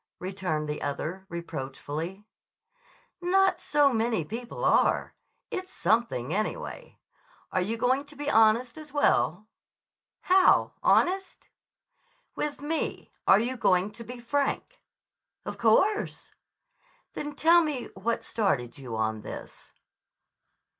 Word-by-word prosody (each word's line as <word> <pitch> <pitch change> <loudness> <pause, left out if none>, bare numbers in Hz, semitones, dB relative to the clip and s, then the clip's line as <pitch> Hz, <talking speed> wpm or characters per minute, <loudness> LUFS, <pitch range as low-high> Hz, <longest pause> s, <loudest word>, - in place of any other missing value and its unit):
_" - - -56
returned 180 -5 -3
the 150 0 -4
other 170 +6 -4
reproachfully. 165 +3 -5 1.0
"Not 375 +1 +3
so 290 -2 +3
many 225 -7 0
people 235 +7 -5
are. - - +3 0.4
It's 370 0 -4
something, 220 - 0
anyway. 215 +2 -4 0.5
Are 185 - +1
you 220 +5 -2
going 260 +4 +1
to 290 +1 -16
be 290 0 -6
honest, 230 +2 +3
as 305 -1 -11
well?" 215 - +2 0.8
"How, 370 0 +4
honest?" 380 +2 +1 0.9
"With 290 -1 -3
me. 320 +2 -3 0.2
Are 195 - +7
you 245 +3 -1
going 185 -4 +2
to 230 +2 -9
be 245 +2 -9
frank?" 280 - -2 0.6
"Of - - -6
course." 385 - +2 0.8
"Then 295 -1 -5
tell 335 +3 +6
me 295 -6 -3
what 225 +5 -2
started 140 - -1
you 125 -4 -6
on 110 0 -1
this." - - -9
230 Hz, 120 wpm, -28 LUFS, 180-290 Hz, 1.0 s, Are